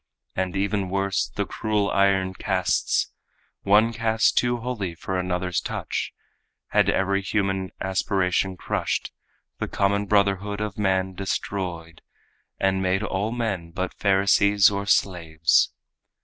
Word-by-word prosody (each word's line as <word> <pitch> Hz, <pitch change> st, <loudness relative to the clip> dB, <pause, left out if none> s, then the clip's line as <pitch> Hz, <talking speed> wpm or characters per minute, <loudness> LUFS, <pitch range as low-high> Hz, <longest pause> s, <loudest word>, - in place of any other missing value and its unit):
And, 95 Hz, 0 st, -2 dB
even 100 Hz, -1 st, 0 dB
worse, 95 Hz, 0 st, 0 dB
the -, -, -3 dB
cruel 105 Hz, -2 st, -1 dB
iron 95 Hz, -1 st, +2 dB
castes, 95 Hz, -2 st, 0 dB, 0.5 s
One 105 Hz, +3 st, +4 dB
caste 110 Hz, -1 st, +2 dB
too 120 Hz, 0 st, +2 dB
holy 115 Hz, -8 st, -4 dB
for 95 Hz, +3 st, -4 dB
another's 90 Hz, -1 st, -1 dB
touch, -, -, -3 dB, 0.6 s
Had -, -, +3 dB
every 100 Hz, +1 st, +1 dB
human 95 Hz, -2 st, -1 dB
aspiration 95 Hz, 0 st, 0 dB
crushed, -, -, -2 dB, 0.5 s
The -, -, -2 dB
common 100 Hz, +1 st, 0 dB
brotherhood 100 Hz, 0 st, +1 dB
of 105 Hz, -2 st, -3 dB
man 95 Hz, -2 st, 0 dB
destroyed, 90 Hz, -3 st, -4 dB, 0.6 s
And 95 Hz, 0 st, +1 dB
made 95 Hz, +2 st, +1 dB
all 105 Hz, +1 st, -1 dB
men 110 Hz, -8 st, -2 dB
but 95 Hz, +2 st, -4 dB
Pharisees 100 Hz, +1 st, +4 dB
or 100 Hz, 0 st, -3 dB
slaves. 80 Hz, -5 st, +2 dB
95 Hz, 120 wpm, -24 LUFS, 95-100 Hz, 0.6 s, One